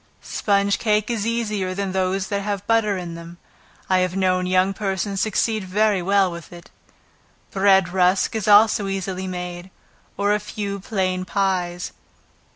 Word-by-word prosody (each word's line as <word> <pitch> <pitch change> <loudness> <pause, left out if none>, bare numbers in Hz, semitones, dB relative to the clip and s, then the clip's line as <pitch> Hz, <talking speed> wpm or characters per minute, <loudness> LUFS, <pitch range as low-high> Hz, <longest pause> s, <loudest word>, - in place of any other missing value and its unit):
Sponge 200 -1 +1
cake 215 0 +1
is 225 -2 -2
easier 210 -5 -2
than 195 -1 -2
those 190 0 -1
that 200 -1 -1
have 200 -1 -3
butter 215 -3 +2
in 175 -2 -6
them; 170 +1 -10 0.5
I 185 -1 +3
have 185 0 0
known 185 -1 +1
young 185 +1 +2
persons 195 -1 -2
succeed 220 +1 0
very 200 +1 +1
well 195 0 +2
with 170 -2 -9
it. 175 -1 -13 0.8
Bread 195 -2 +4
rusk 185 +3 +2
is 215 -3 -2
also 210 -1 +5
easily 190 -1 -3
made, 180 0 -6 0.5
or 205 +1 +2
a 210 - +1
few 205 -1 -5
plain 185 -2 -1
pies. 185 -2 -1
195 Hz, 155 wpm, -22 LUFS, 185-205 Hz, 0.8 s, also